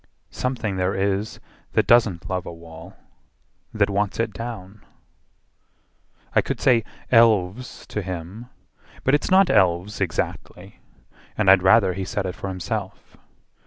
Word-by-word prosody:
Something 120 -6 -3
there 90 +1 0
is 100 +2 -1 0.3
that - - +2
doesn't 105 -7 +3
love 90 -1 -3
a - - -5
wall, 85 +2 -12 0.8
That 105 -2 +1
wants 100 +1 -2
it 115 -2 -1
down." 105 -3 -8 1.5
I - - +5
could - - -4
say 120 -4 +3 0.3
"Elves" 115 -1 +2
to 105 - -4
him, 95 +5 -7 0.6
But 135 - +2
it's 145 - +1
not 190 0 +5
elves 95 0 +1
exactly, 85 -5 -4 0.6
and 100 -3 +5
I'd 95 -1 +6
rather 95 0 +4
He 95 +2 -4
said 95 +1 -3
it 90 - -3
for 100 - -7
himself. 95 -1 -5
100 Hz, 135 wpm, -23 LUFS, 90-115 Hz, 1.5 s, I'd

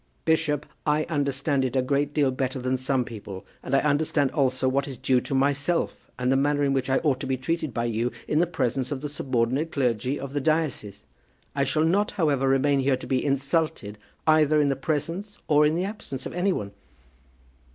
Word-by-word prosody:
"Bishop, 150 -2 +1 0.2
I 150 0 +2
understand 140 -2 0
it 130 -1 -2
a 130 - +3
great 140 +2 0
deal 145 -3 +2
better 130 0 -2
than 130 0 -1
some 130 0 0
people; 100 -5 -8 0.2
and 135 - -1
I 135 - +4
understand 145 -1 +1
also 130 -3 +1
what 140 +2 +1
is 135 -3 -7
due 130 -2 +2
to 135 - -3
myself 145 +5 0
and 125 0 0
the - - +4
manner 145 +1 +2
in 140 -1 +2
which 135 -1 -1
I 135 - +3
ought 140 -5 +2
to 135 - -4
be 130 0 0
treated 155 +3 -2
by 115 +1 -2
you 120 +1 -1 0.2
in 150 - +2
the 175 - +3
presence 130 -4 -1
of 135 -2 -3
the 150 - -4
subordinate 135 +2 -1
clergy 125 -1 0
of 140 0 -6
the 145 - -1
diocese. 145 -10 -1 0.5
I 140 -1 +1
shall 155 +3 +1
not, 200 +5 +2
however, 145 -8 +1
remain 135 +1 +3
here 135 -1 +2
to - - -9
be 130 -1 0
insulted 140 -6 -1 0.3
either 155 -1 +4
in 145 -1 +3
the 135 - +1
presence 165 +9 -3
or 150 0 +5
in 155 - 0
the 180 +2 0
absence 195 -10 -6
of - - -5
any 180 +3 +1
one." 100 - -3
140 Hz, 210 wpm, -26 LUFS, 130-150 Hz, 0.5 s, or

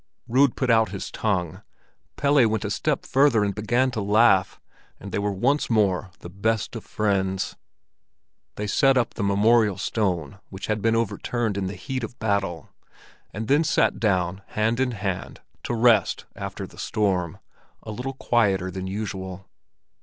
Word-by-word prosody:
Rud 130 +2 +3
put 130 -2 +1
out 110 -1 +4
his 100 - -6
tongue, 90 -7 -2 0.5
Pelle 140 -4 +4
went 110 -1 -1
a - - -2
step - - -1
further 135 -5 +3
and 100 -1 0
began 120 +6 +1
to 115 -3 -3
laugh, 100 -2 +3 0.4
and 100 - -9
they - - -1
were 100 0 0
once 130 +10 +1
more 100 -4 +1
the - - -8
best 110 +4 -1
of 115 - -6
friends. 95 -3 -1 1.0
They 105 - -3
set 135 +6 +3
up 120 -2 +1
the - - -5
memorial 105 +1 +3
stone, 95 -4 -2
which 95 0 -7
had 110 -1 -1
been 115 +1 +2
overturned 115 0 -1
in 100 -1 -2
the 95 - -5
heat 130 +7 -4
of 115 +2 -6
battle, 100 -7 -1 0.6
and 110 +2 -6
then 145 +4 +4
sat 160 - +2
down 95 -3 0 0.2
hand 110 +3 +1
in 130 -2 +1
hand, 95 -4 -4 0.2
to 120 - -1
rest 115 -5 +3
after - - -6
the - - -15
storm, 95 -6 -1 0.5
a - - -7
little 125 +5 -4
quieter 100 -8 +1
than 95 +1 -5
usual. 95 -2 -5
105 Hz, 165 wpm, -24 LUFS, 95-115 Hz, 1.0 s, out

